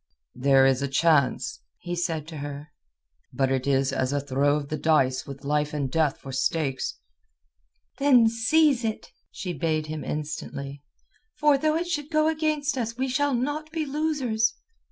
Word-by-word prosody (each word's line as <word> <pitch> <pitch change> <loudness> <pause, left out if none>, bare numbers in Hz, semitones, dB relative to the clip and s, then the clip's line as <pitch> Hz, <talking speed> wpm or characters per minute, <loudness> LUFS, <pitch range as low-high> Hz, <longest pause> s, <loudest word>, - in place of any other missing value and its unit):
"There 135 +1 +4
is 135 0 +3
a 140 - 0
chance," 140 -1 +2 0.2
he 175 0 -5
said 165 -3 -2
to 160 - -8
her. 145 +1 -7 0.6
"But 135 +1 0
it 135 0 -1
is 135 -1 +2
as 130 0 0
a 145 - +1
throw 140 +1 +1
of 145 -1 -4
the 155 - -2
dice 135 -5 +2
with 140 0 -9
life 150 +1 0
and 140 -3 -2
death 155 -3 +1
for 135 - -9
stakes." 135 0 -1 1.0
"Then 260 -5 +6
seize 250 +4 +3
it," 220 -1 -4 0.2
she 180 -2 -5
bade 155 0 -1
him 155 -1 -5
instantly. 145 -1 -5 0.5
"For 295 -2 +4
though 310 +3 +1
it 335 +2 0
should 300 -4 -3
go 310 -1 +2
against 305 -3 0
us 230 0 -3
we 260 +1 -1
shall 285 +1 +1
not 290 +5 -2
be 320 -1 -2
losers." 270 -7 0
160 Hz, 170 wpm, -26 LUFS, -, 1.0 s, Then